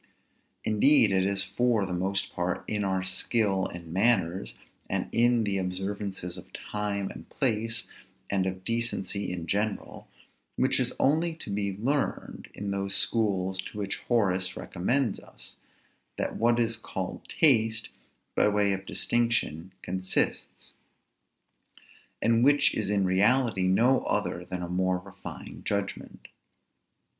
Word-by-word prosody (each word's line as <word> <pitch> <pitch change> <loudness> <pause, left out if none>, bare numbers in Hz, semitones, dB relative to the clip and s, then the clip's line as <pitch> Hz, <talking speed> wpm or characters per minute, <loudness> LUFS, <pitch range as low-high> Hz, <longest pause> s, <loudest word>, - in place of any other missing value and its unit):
Indeed 110 +1 +5
it 95 0 +2
is 100 -1 +2
for 110 +2 +1
the 95 - -4
most 95 +2 -1
part 90 +1 -2
in 105 -1 -1
our 95 -1 0
skill 95 +1 +1
in 85 -1 -9
manners, 95 -3 +1 0.3
and - - -1
in 120 0 +3
the 100 -2 0
observances 95 -1 -3
of - - -15
time 105 -2 -3
and - - -11
place, 115 -2 0 0.4
and 95 -1 0
of 95 0 -5
decency 115 -4 -1
in 85 -2 -4
general, 105 +5 -2 0.5
which - - +2
is - - +1
only 160 +4 +2
to 160 - -7
be 100 -1 -1
learned 135 +7 -2
in 100 0 -4
those 100 0 -1
schools 95 -4 +1
to 105 - -10
which 100 -1 -3
Horace 95 -5 +1
recommends 115 +5 0
us, - - -12 0.6
that - - -2
what 120 +1 +2
is 115 -1 +2
called 95 -4 -6
taste, 115 -7 +3 0.4
by - - +3
way 105 -1 +2
of 95 0 -5
distinction, 115 -8 0
consists: 95 +1 -1 1.5
and 115 +1 +3
which 145 +2 +5
is 105 -3 -1
in 100 -2 +2
reality 100 +1 +3
no 120 +8 +4
other 85 - -1
than 90 0 -4
a - - -3
more 90 +1 +1
refined 95 0 -9
judgment. 100 -1 -4
100 Hz, 135 wpm, -28 LUFS, 95-115 Hz, 1.5 s, Indeed